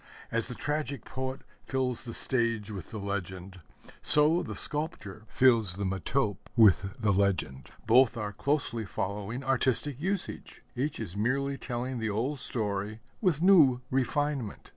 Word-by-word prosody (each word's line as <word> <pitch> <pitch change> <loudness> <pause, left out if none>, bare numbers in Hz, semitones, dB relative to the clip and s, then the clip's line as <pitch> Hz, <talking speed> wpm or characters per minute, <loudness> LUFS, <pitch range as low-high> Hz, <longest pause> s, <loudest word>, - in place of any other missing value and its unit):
As 115 0 +1
the 125 - -6
tragic 150 0 -3
poet 130 +1 -5 0.2
fills 130 -2 -2
the 115 - -6
stage 115 -4 0
with 95 -6 -7
the 110 - -6
legend, 95 -2 -5 0.4
so 155 +4 +5
the 175 - -6
sculptor 110 - -4
fills 115 -7 +4
the 100 - -4
metope 100 +3 -1
with 100 -3 +5
the 105 -3 +2
legend. 95 -9 0 0.2
Both 120 +1 +5
are 105 -2 -4
closely 130 -2 -1
following 105 +5 -4
artistic 135 +1 0
usage: 195 +2 -3
each 140 +4 -2
is 100 -5 -6
merely 135 +6 0
telling 125 -1 -4
the 115 -1 -1
old 125 +8 -1
story 105 -3 -2 0.2
with 175 -6 +1
new 150 -10 +6
refinement. 135 -2 -1
120 Hz, 140 wpm, -29 LUFS, 100-135 Hz, 0.4 s, new